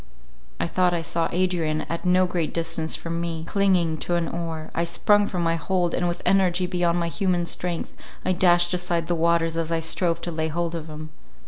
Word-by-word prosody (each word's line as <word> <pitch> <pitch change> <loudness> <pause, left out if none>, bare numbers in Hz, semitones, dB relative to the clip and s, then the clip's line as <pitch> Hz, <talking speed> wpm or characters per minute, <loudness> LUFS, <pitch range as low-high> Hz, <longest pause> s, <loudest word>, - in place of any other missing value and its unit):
I - - +1
thought 180 +1 +2
I 165 - -2
saw 165 0 -1
Adrian 170 -4 0
at 170 +2 -5
no 180 +1 +4
great 175 -3 -2
distance 165 -1 -1
from 170 0 -4
me, 165 -1 -3
clinging 180 -5 +2
to 175 - -1
an 170 -1 0
oar; 165 -2 -5
I 170 - 0
sprung 205 +4 +3
from 180 -4 -2
my 165 0 +1
hold, 175 +1 0
and 175 - 0
with 175 0 -3
energy 185 -1 +3
beyond 175 -1 +1
my 170 - 0
human 180 -1 0
strength, 175 0 -4 0.3
I - - +2
dashed 175 -1 +4
aside 175 -2 0
the 175 - 0
waters 165 0 +1
as 165 0 -2
I 165 - +1
strove 165 +1 0
to 175 - -4
lay 160 -1 -1
hold 170 +1 -2
of 165 -2 -5
him. 155 0 -8
170 Hz, 210 wpm, -24 LUFS, 165-180 Hz, 0.3 s, no